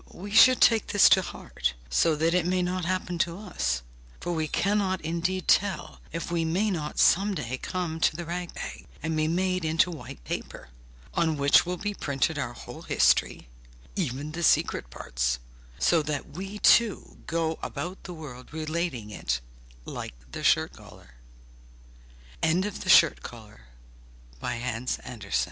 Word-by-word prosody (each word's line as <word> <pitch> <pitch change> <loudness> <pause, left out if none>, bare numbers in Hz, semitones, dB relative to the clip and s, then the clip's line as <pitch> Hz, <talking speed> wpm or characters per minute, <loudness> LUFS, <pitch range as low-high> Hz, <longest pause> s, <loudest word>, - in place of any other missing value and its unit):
We 200 +3 -8
should 255 +4 +7
take 225 -2 +5
this 205 - +6
to 190 - +6
heart, 175 - -4
so 155 - +3
that 165 +2 +1
it 180 -1 +2
may 180 0 +1
not 180 0 -2
happen 180 -1 -2
to 170 0 0
us, - - -2 0.4
for 175 - -3
we 160 -2 -1
cannot 195 +2 +1
indeed 170 +3 -2
tell 195 -5 +1
if 165 +1 -4
we 170 -1 +1
may 185 +7 +1
not 150 -5 -4
some 200 +2 +4
day 130 -5 -4
come 175 -3 -3
to 160 - +2
the 175 +1 -5
rag 175 +1 -4
bag, - - -7 0.2
and 160 0 -1
be 155 0 +1
made 185 +2 0
into 160 +3 +2
white 150 - -9
paper, - - -6 0.4
on 160 -2 +1
which 140 +4 +5
will 180 0 -2
be 205 +3 -3
printed 145 -2 -1
our 120 -3 -3
whole - - -10
history, - - +2 0.5
even 145 -4 -2
the 165 - -6
most 170 - +5
secret 60 - +1
parts, - - -2 0.4
so 165 - +3
that 150 -2 -4
we 195 +5 -6
too 225 0 +3
go 165 -1 -1
about 180 +2 -5
the 180 - -6
world 135 -6 -10
relating 155 -8 -3
it, 60 -10 -2 0.5
lik - - -6
165 Hz, 140 wpm, -27 LUFS, 150-185 Hz, 0.5 s, should